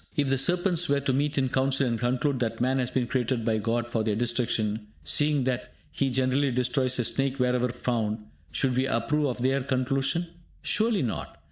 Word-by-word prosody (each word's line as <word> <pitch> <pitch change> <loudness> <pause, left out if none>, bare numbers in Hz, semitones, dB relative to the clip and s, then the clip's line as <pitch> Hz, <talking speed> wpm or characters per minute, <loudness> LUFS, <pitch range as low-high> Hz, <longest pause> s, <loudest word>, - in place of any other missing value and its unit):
If 145 -4 +1
the 135 -1 +2
serpents 175 +3 +1
were 140 0 +3
to 135 -1 0
meet 145 +2 0
in 130 -1 +2
council 135 +1 +2
and 115 -2 -1
conclude 130 +3 0
that 115 -2 -2
man 130 +2 +1
has 125 -1 0
been 130 -2 0
created 120 -1 -1
by 110 -1 +1
God 115 +2 -1
for 115 -2 -1
their 110 -2 0
destruction, 115 -2 0 0.2
seeing 145 - +2
that 125 -1 -3 0.2
he 135 - 0
generally 130 +2 +2
destroys 125 +1 +1
a 120 - +1
snake 135 +3 -1
wherever 125 -1 +1
found, 115 -3 -2 0.3
should 125 +11 +1
we 130 +1 +2
approve 145 +5 +1
of 125 - -2
their 135 +1 +2
conclusion? 135 +5 0 0.4
Surely 220 -5 +2
not. 115 - -4
130 Hz, 195 wpm, -27 LUFS, 120-135 Hz, 0.4 s, were